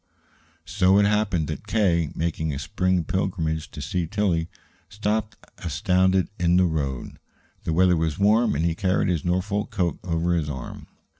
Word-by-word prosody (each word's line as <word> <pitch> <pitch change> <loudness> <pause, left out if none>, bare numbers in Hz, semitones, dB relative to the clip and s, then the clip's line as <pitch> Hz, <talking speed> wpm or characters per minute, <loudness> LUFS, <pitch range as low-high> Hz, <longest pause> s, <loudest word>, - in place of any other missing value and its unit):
So 95 +2 +3
it 100 - +5
happened 105 -6 +1
that 75 - -6
K., 85 -8 +2
making 80 -1 -1
a 70 - -4
spring 90 +5 0
pilgrimage 80 -4 -2
to 75 - -8
see 85 +3 -2
Tillie, 90 -4 0 0.4
stopped 105 +2 -2 0.2
astounded 90 +3 +1
in 90 0 +3
the 90 - +5
road. 70 -6 -3 0.5
The 80 - 0
weather 90 +1 +4
was 80 -2 -1
warm, 110 0 +3
and 80 +4 0
he 85 - +1
carried 90 +2 0
his 85 -4 0
Norfolk 95 +4 -1
coat 95 -7 -1
over 85 0 0
his 80 -3 0
arm. 65 -3 -7
90 Hz, 160 wpm, -24 LUFS, 80-95 Hz, 0.5 s, it